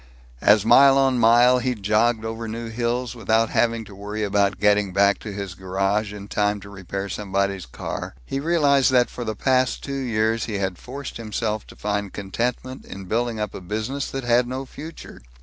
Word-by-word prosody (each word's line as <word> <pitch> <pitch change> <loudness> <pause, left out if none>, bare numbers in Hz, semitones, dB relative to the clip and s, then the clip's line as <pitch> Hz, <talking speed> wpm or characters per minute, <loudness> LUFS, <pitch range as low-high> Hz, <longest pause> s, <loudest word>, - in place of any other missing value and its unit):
As 105 0 +5
mile 135 +3 +7
on 135 -2 +3
mile 120 +2 +6
he 125 0 -1
jogged 110 +2 +1
over 115 +1 -4
new 115 +1 -5
hills, 120 +1 -2
without 110 0 +1
having 115 -1 +1
to 105 - -13
worry 105 +2 -5
about 100 0 +1
getting 105 -2 +3
back 100 +1 +3
to 105 - -7
his 100 -2 -5
garage 95 +3 -1
in 100 -1 -8
time 105 0 0
to 100 - -11
repair 95 0 -5
somebody's 100 -3 -2
car, - - -6
he 135 - -3
realized 145 -3 +3
that 125 -1 +3
for 120 - -5
the 110 -2 -3
past 130 +2 +1
two 140 - -5
years 115 -4 0
he 110 - -4
had 95 -2 -2
forced 140 +2 -7
himself 110 -1 -3
to - - -13
find 100 -1 -3
contentment 120 +6 -3
in 95 -1 -9
building 115 +3 -1
up 105 -2 -3
a - - -7
business 110 +9 -3
that 135 0 -4
had 120 0 +3
no 130 +2 -4
future. 155 +5 -10
110 Hz, 190 wpm, -23 LUFS, 100-125 Hz, -, mile